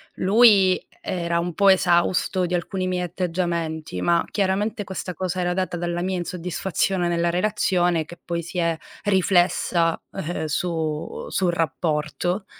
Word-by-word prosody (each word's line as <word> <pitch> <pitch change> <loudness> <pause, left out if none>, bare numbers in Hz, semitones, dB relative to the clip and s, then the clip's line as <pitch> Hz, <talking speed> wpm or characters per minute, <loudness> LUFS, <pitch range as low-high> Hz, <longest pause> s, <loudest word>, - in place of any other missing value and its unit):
lui 195 -2 +5
era 170 -1 -1
un 175 0 -2
po' 200 +3 +4
esausto 185 0 +3
di 175 - -4
alcuni 185 +2 -2
miei 180 -1 -1
atteggiamenti, 170 - -2
ma 170 - +2
chiaramente 205 +3 0
questa 190 -1 -5
cosa 185 +1 -3
era 175 0 0
data 185 -1 -2
dalla 175 0 -2
mia 185 +1 -1
insoddisfazione 180 +1 -1
nella 170 0 +1
relazione, 180 -2 +1
che 175 +2 -13
poi 170 -1 -2
si 170 +3 -7
è 170 -2 +1 0.3
riflessa, 175 -3 +2
ehm, 175 -3 -4
su 155 -1 -3
sul 180 -2 +1
rapporto. 165 +4 -1
175 Hz, 140 wpm, -23 LUFS, 170-185 Hz, 0.3 s, lui